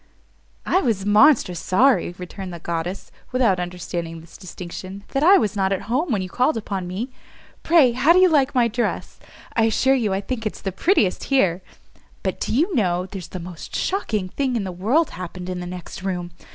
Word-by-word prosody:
"I 375 Hz, -, +2 dB
was 215 Hz, -7 st, 0 dB
monstrous 205 Hz, -, +4 dB
sorry," 230 Hz, -3 st, +2 dB
returned 185 Hz, +1 st, -7 dB
the 170 Hz, -, -6 dB
goddess, 170 Hz, +2 st, -4 dB, 0.2 s
without 240 Hz, -8 st, +2 dB
understanding 175 Hz, -2 st, -5 dB
this 165 Hz, +1 st, -15 dB
distinction, 185 Hz, +1 st, -8 dB
"that 275 Hz, -, -1 dB
I 385 Hz, +5 st, +8 dB
was 215 Hz, -, 0 dB
not 190 Hz, -1 st, +1 dB
at 195 Hz, -, -1 dB
home 265 Hz, +8 st, -1 dB
when 200 Hz, -5 st, 0 dB
you -, -, -5 dB
called 250 Hz, -, +1 dB
upon 195 Hz, -4 st, -4 dB
me. 210 Hz, +9 st, -4 dB, 0.5 s
Pray, 320 Hz, -7 st, +5 dB
how 260 Hz, +7 st, +3 dB
do 350 Hz, -, +6 dB
you 370 Hz, 0 st, +7 dB
like 285 Hz, -5 st, +2 dB
my 240 Hz, -2 st, +4 dB
dress? 235 Hz, +2 st, -3 dB, 0.4 s
I 225 Hz, -, +4 dB
assure 260 Hz, +4 st, +3 dB
you 230 Hz, -7 st, +1 dB
I 190 Hz, -, 0 dB
think 225 Hz, +1 st, -3 dB
it's -, -, -7 dB
the 195 Hz, -, -3 dB
prettiest 205 Hz, -, +1 dB
here. 190 Hz, -10 st, +2 dB, 0.6 s
But -, -, -2 dB
do -, -, -2 dB
you 325 Hz, -, +2 dB
know 180 Hz, -, +1 dB
there's 190 Hz, -2 st, -8 dB
the 185 Hz, -, -7 dB
most 175 Hz, -1 st, -8 dB
shocking 220 Hz, -, -1 dB
thing 260 Hz, +3 st, -1 dB
in 225 Hz, -, 0 dB
the 190 Hz, -, -4 dB
world 225 Hz, -, +1 dB
happened 180 Hz, +1 st, -7 dB
in 180 Hz, -, -4 dB
the 180 Hz, -, -5 dB
next 180 Hz, -1 st, -8 dB
room! 180 Hz, -2 st, -3 dB
200 Hz, 200 wpm, -22 LUFS, 180-255 Hz, 0.6 s, I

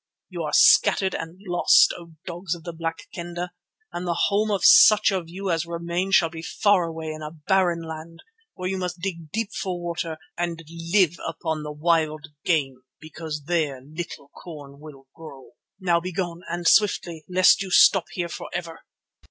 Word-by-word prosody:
You -, -, -6 dB
are -, -, -3 dB
scattered 190 Hz, -1 st, +5 dB
and 165 Hz, +3 st, -6 dB
lost, 175 Hz, -1 st, +5 dB
O 170 Hz, -1 st, -12 dB
dogs 175 Hz, 0 st, -4 dB
of 165 Hz, -, -13 dB
the 170 Hz, -, -6 dB
Black 165 Hz, 0 st, -5 dB
Kendah, 175 Hz, +1 st, -5 dB, 0.4 s
and 175 Hz, +1 st, -4 dB
the 170 Hz, -, 0 dB
home 210 Hz, +2 st, +1 dB
of 200 Hz, -2 st, 0 dB
such 215 Hz, -, +7 dB
of 180 Hz, -4 st, -3 dB
you 190 Hz, +2 st, -4 dB
as 165 Hz, 0 st, -1 dB
remain 170 Hz, +2 st, -3 dB
shall 170 Hz, -4 st, +4 dB
be 160 Hz, -1 st, -8 dB
far 185 Hz, +2 st, +2 dB
away 160 Hz, -1 st, -5 dB
in 155 Hz, 0 st, -8 dB
a 150 Hz, -, -5 dB
barren 170 Hz, +2 st, 0 dB
land, 160 Hz, +1 st, -9 dB, 0.3 s
where 185 Hz, -, -4 dB
you 190 Hz, 0 st, -2 dB
must 180 Hz, -1 st, -4 dB
dig 170 Hz, -4 st, -5 dB
deep 220 Hz, +4 st, -3 dB
for 185 Hz, -2 st, -3 dB
water 170 Hz, -2 st, -4 dB, 0.2 s
and 170 Hz, -1 st, -3 dB, 0.3 s
live 180 Hz, -4 st, +3 dB
upon 160 Hz, -1 st, -3 dB
the 150 Hz, 0 st, -6 dB
wild 155 Hz, 0 st, 0 dB
game 135 Hz, -7 st, 0 dB, 0.2 s
because 155 Hz, -1 st, -7 dB
there 155 Hz, -4 st, -1 dB
little 150 Hz, +1 st, -8 dB
corn 145 Hz, -4 st, -11 dB
will 145 Hz, -3 st, -13 dB
grow.' 145 Hz, -5 st, -12 dB, 0.3 s
Now 175 Hz, -3 st, +2 dB
begone, 175 Hz, -1 st, -4 dB
and 170 Hz, 0 st, -2 dB
swiftly, 175 Hz, -6 st, +2 dB
lest 185 Hz, +1 st, +5 dB
you 195 Hz, -, -4 dB
stop 185 Hz, 0 st, +5 dB
here 175 Hz, -2 st, -3 dB
for 170 Hz, -, -8 dB
ever." 170 Hz, -2 st, -6 dB
170 Hz, 175 wpm, -24 LUFS, 160-180 Hz, 0.4 s, such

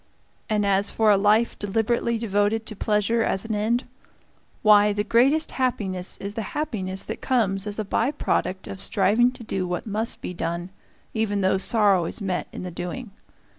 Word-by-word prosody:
And 210 Hz, -1 st, +1 dB
as 200 Hz, 0 st, +2 dB
for 220 Hz, -1 st, +3 dB
a -, -, +6 dB
life 210 Hz, +4 st, +2 dB
deliberately 225 Hz, +3 st, 0 dB
devoted 215 Hz, 0 st, 0 dB
to 215 Hz, -, -5 dB
pleasure 210 Hz, +3 st, +1 dB
as 195 Hz, -2 st, 0 dB
an 225 Hz, -, -3 dB
end 225 Hz, +5 st, 0 dB, 0.8 s
why, 210 Hz, -1 st, +6 dB
the 205 Hz, 0 st, -1 dB
greatest 270 Hz, +9 st, +3 dB
happiness 195 Hz, -8 st, -2 dB
is 200 Hz, +1 st, -6 dB
the 225 Hz, -, -3 dB, 0.2 s
happiness 195 Hz, -10 st, -2 dB
that -, -, -6 dB
comes 210 Hz, -6 st, +1 dB
as 205 Hz, -, -2 dB
a 215 Hz, -, -2 dB
by 225 Hz, +5 st, +1 dB
product 190 Hz, -9 st, -1 dB
of 190 Hz, -, -7 dB
striving 210 Hz, +6 st, +3 dB
to 240 Hz, -, -11 dB
do 190 Hz, -4 st, -2 dB
what 175 Hz, 0 st, -3 dB
must 220 Hz, +1 st, -2 dB
be -, -, -6 dB
done, 170 Hz, +1 st, -4 dB, 0.4 s
even 210 Hz, -2 st, 0 dB
though 190 Hz, 0 st, +2 dB
sorrow 200 Hz, -4 st, +3 dB
is -, -, -4 dB
met 190 Hz, -3 st, -2 dB
in -, -, -7 dB
the 180 Hz, -, -5 dB
doing. 180 Hz, +7 st, -6 dB
210 Hz, 180 wpm, -24 LUFS, 195-225 Hz, 0.8 s, a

